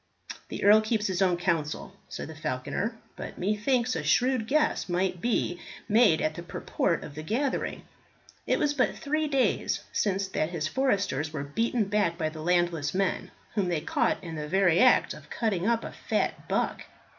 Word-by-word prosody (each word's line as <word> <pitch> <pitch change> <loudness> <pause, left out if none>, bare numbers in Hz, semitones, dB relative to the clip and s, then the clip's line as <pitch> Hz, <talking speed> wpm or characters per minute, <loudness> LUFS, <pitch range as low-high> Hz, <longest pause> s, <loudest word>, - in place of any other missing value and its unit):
"The - - -5
earl 210 +2 +7
keeps 215 -1 0
his 190 -1 -1
own 180 -2 +3
counsel," 165 -4 -1 0.2
said - - -6
the 160 - -9
falconer, 155 - -3 0.2
"but - - -7
methinks 230 +6 +1
a - - -1
shrewd 250 -3 +2
guess 300 -6 +1
might 180 0 0
be 210 -6 0 0.3
made 215 -7 +5
at 155 - 0
the 170 - -7
purport 170 0 -1
of - - -8
the 155 - -6
gathering. 250 - -2 0.6
It - - +3
was 295 -2 +1
but 265 -3 +1
three 305 0 -1
days 275 -3 +1
since 195 -1 0
that 155 -4 -1
his 165 -3 -2
foresters 195 - 0
were 145 -3 -4
beaten 225 - 0
back 200 -4 +1
by 160 -2 0
the 155 0 -9
landless 170 -3 +1
men, 195 -1 0 0.2
whom 200 -4 0
they 165 -3 0
caught - - +1
in 165 -2 -6
the 150 -1 -4
very 180 0 +3
act 255 +2 +5
of - - -13
cutting 205 -5 -1
up 230 -1 +2
a - - -6
fat - - -2
buck. - - -1
190 Hz, 180 wpm, -28 LUFS, 165-230 Hz, 0.6 s, earl